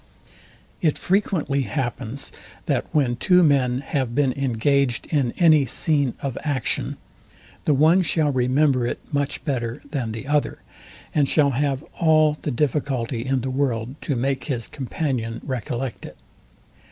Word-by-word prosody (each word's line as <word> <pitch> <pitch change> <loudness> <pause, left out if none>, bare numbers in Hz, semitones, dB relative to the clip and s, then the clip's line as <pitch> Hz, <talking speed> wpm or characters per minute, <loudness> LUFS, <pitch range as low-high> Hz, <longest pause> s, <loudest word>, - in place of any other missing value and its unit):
It 155 -4 +2
frequently 180 -7 0
happens, 130 -1 -3 0.3
that - - 0
when 130 -5 +1
two 180 +7 +4
men 130 -4 +2
have 135 -4 -2
been 135 -3 +2
engaged 135 0 +1
in 140 -6 +1
any 155 -5 +5
scene 140 0 +1
of 135 -3 -3
action, 130 - -1 0.7
the 150 - +3
one 160 +6 +5
shall 155 -4 +1
remember 130 0 +2
it - - -2 0.2
much 145 +1 -1
better 120 -5 -2
than 125 -7 -2
the 110 +3 -6
other, 145 +1 0 0.6
and 145 -3 +2
shall 145 -3 +3
have 135 +1 -1 0.2
all 155 -2 +4
the - - -2
difficulty 130 -3 -1
in 130 0 0
the 130 +2 -3
world 130 -3 -1
to 140 - -1
make 130 +2 -1
his 125 -7 -3
companion 130 -4 -3
recollect 125 -1 -4
it. - - -11
135 Hz, 140 wpm, -23 LUFS, 125-150 Hz, 0.7 s, any